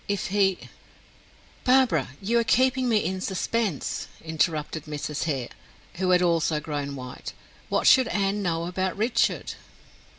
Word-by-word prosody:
If 200 -1 -2
he 195 -1 +2 0.6
" - - -29 0.2
"Barbara, 260 -1 +3
you 235 +4 +2
are - - +2
keeping 255 +2 +2
me 215 -5 +2
in 185 +2 -2
suspense," 195 - -2 0.2
interrupted 160 -1 -1
Mrs. 150 0 -4
Hare, 135 -6 -2 0.5
who 185 0 0
had 180 0 +4
also 165 -3 +2
grown 145 -2 -4
white. 125 -1 -8 0.4
"What - - 0
should 260 -1 +6
Anne 200 -1 0
know 165 -3 -1
about 185 +2 -2
Richard?" 225 +3 +1
185 Hz, 140 wpm, -26 LUFS, 155-215 Hz, 0.6 s, should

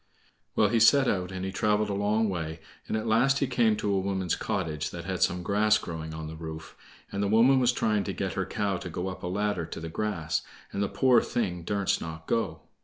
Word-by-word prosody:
Well, 105 - +4
he 115 +1 +2
set 135 +4 +6
out, 90 -1 0
and 95 0 -4
he 95 - -3
traveled 105 +2 +1
a - - -1
long 105 +2 +1
way, 80 -4 -3 0.3
and - - -1
at 110 - -3
last 120 +5 +3
he 140 - +1
came 120 -4 +2
to 100 - 0
a 95 - +2
woman's 95 -2 -1
cottage 75 -2 -2
that 85 -1 -7
had 95 -1 -3
some 90 0 +2
grass 105 +3 +3
growing 80 -1 -6
on 80 0 -6
the 80 +1 -7
roof. 80 0 -8 0.4
And 100 - -2
the 100 - +1
woman 120 +6 +5
was 125 -1 +4
trying 110 -4 +1
to - - -2
get - - -3
her - - -2
cow 100 -2 -1
to 90 - -7
go 90 +3 -3
up 90 - -8
a - - -4
ladder 100 -2 -1
to 85 - -7
the 80 0 -6
grass, 85 -4 -1 0.3
and 100 - -2
the 100 - +1
poor 125 -3 +4
thing 90 -7 -2
durst 100 +3 0
not 80 0 -7
go. 80 -9 -1
100 Hz, 240 wpm, -28 LUFS, 85-110 Hz, 0.4 s, set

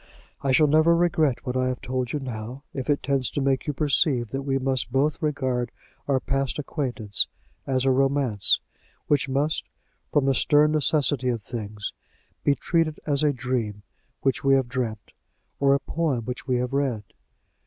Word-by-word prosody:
I 135 - +1
shall 155 +4 +5
never 155 +3 +5
regret 160 -7 +1
what 125 -1 -3
I 130 0 +1
have 130 -1 -2
told 125 -1 -3
you 150 - -1
now, 125 +1 -6
if 135 0 -5
it 145 - +1
tends 135 -3 +1
to - - -3
make 135 0 0
you 150 - 0
perceive 135 - +1
that 135 - -2
we 135 -1 0
must 130 -2 -1
both 140 +4 +1
regard 130 -5 -1 0.4
our 135 -2 +2
past 135 0 -1
acquaintance 125 -8 -1 0.4
as 130 -1 +1
a 135 - +4
romance, 135 -6 +2 0.5
which 140 -2 +1
must, 145 +4 0 0.4
from 145 -2 +3
the 135 - +3
stern 150 +3 +4
necessity 145 -4 +2
of 115 -4 -2
things, 105 -3 -5 0.5
be 140 - +3
treated 165 -2 0
as 145 -2 +1
a 150 -1 +3
dream 120 -6 -3 0.4
which 135 - 0
we 135 0 +5
have 135 -2 +1
dreamt, 120 -4 -4 0.5
or 140 0 +4
a - - +1
poem 140 -5 -1
which 125 +1 -5
we 130 - +2
have 125 +1 -1
read." 135 -6 0
135 Hz, 175 wpm, -25 LUFS, 125-145 Hz, 0.5 s, shall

